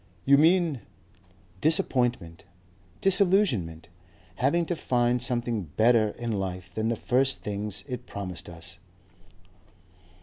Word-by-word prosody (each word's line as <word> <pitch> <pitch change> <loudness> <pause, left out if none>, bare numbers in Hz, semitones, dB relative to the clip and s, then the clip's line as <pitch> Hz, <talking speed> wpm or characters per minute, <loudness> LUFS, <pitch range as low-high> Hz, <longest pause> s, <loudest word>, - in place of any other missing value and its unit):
"You 140 - +6
mean?" 165 -4 +3 0.8
"Disappointment. 120 - 0 0.6
Disillusionment. 180 - +3 0.5
Having 165 +6 +1
to 175 - -2
find 120 -4 0
something 120 -4 -1
better 115 -1 +4
in 120 -1 -4
life 90 -4 -4
than 110 +3 -2
the 115 - 0
first 130 +4 0
things 105 0 -4
it 125 -2 -7
promised 95 -4 -7
us." 85 +3 -10
120 Hz, 105 wpm, -26 LUFS, 100-135 Hz, 0.8 s, You